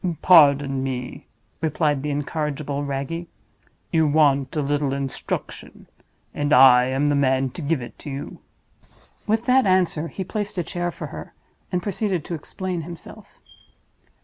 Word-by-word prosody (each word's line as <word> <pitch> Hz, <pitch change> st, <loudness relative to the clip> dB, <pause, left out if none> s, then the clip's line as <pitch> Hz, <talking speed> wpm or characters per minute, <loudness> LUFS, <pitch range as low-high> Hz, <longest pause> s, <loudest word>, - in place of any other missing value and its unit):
"Pardon 140 Hz, -5 st, +5 dB
me," 125 Hz, -2 st, -5 dB, 0.3 s
replied 150 Hz, -3 st, 0 dB
the 150 Hz, -, -3 dB
incorrigible 145 Hz, -1 st, -3 dB
Wragge. 140 Hz, +5 st, -4 dB, 0.6 s
"You 160 Hz, -2 st, +3 dB
want 140 Hz, -2 st, +2 dB
a 150 Hz, -, 0 dB
little 145 Hz, -1 st, 0 dB
instruction; 135 Hz, -1 st, -5 dB, 0.5 s
and 145 Hz, 0 st, -2 dB
I 125 Hz, -3 st, +7 dB
am 135 Hz, +3 st, 0 dB
the 145 Hz, 0 st, +2 dB
man 130 Hz, -1 st, +1 dB
to 150 Hz, -, -8 dB
give 145 Hz, -3 st, -1 dB
it 120 Hz, -, -12 dB
you." 140 Hz, -1 st, -7 dB, 0.9 s
With 220 Hz, +2 st, +1 dB
that 255 Hz, -2 st, +4 dB
answer, 180 Hz, -4 st, +2 dB
he 190 Hz, +5 st, -5 dB
placed 205 Hz, +1 st, -4 dB
a 175 Hz, -, 0 dB
chair 175 Hz, +1 st, -3 dB
for -, -, -7 dB
her, -, -, -9 dB, 0.4 s
and 180 Hz, -1 st, -1 dB
proceeded 195 Hz, -4 st, -2 dB
to -, -, -5 dB
explain 180 Hz, +2 st, -4 dB
himself. 170 Hz, +1 st, -11 dB
150 Hz, 145 wpm, -23 LUFS, 140-175 Hz, 0.9 s, I